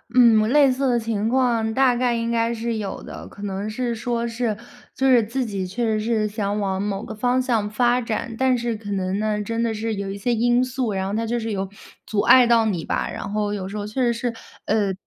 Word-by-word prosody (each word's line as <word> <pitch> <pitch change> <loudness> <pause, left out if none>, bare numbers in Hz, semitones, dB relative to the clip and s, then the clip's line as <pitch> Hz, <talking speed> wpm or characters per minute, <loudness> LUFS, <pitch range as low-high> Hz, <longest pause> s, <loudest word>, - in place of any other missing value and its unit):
嗯， 235 -3 +7
我 215 - +1
类 275 +2 +5
似 270 +1 0
的 240 - +3
情 220 -2 -1
况 235 -3 +1
大 265 -1 +4
概 245 0 +1
应 230 0 -1
该 230 0 +1
是 230 0 -2
有 205 -2 -5
的， - - -9
可 200 - -13
能 200 +1 -3
是 240 +1 -2
说 235 +1 -2
是， 230 -2 -1 0.4
就 265 - 0
是 250 -3 +6
自 245 +4 -2
己 195 -4 -3
确 235 +6 -3
实 220 -1 +1
是 220 0 0
想 205 -1 -2
往 190 -1 -1
某 205 0 -2
个 225 - -7
方 245 +4 +1
向 230 -5 0
发 240 +3 +2
展， 230 -1 -3
但 260 0 +3
是 235 0 -2
可 210 -1 -9
能 190 +1 -1
呢， 215 -1 0
真 230 +2 -2
的 230 -1 0
是 220 +1 -2
有 200 -1 -4
一 195 - -5
些 240 +4 0
因 240 +2 +3
素， 250 -4 -2
然 190 0 -1
后 195 - -3
它 225 +2 -1
就 240 +2 0
是 225 -1 -3
有 195 -1 -2 0.4
阻 210 -2 0
碍 250 -2 +7
到 235 -1 +5
你 180 -7 -1
吧。 - - -1
然 200 - -6
后 210 -1 0
有 190 -2 -4
时 200 - -7
候 205 - -3
确 215 +5 -3
实 240 -1 +3
是， 235 0 -2 0.3
呃 205 -3 +1
225 Hz, 265 characters per minute, -23 LUFS, 210-240 Hz, 0.4 s, 嗯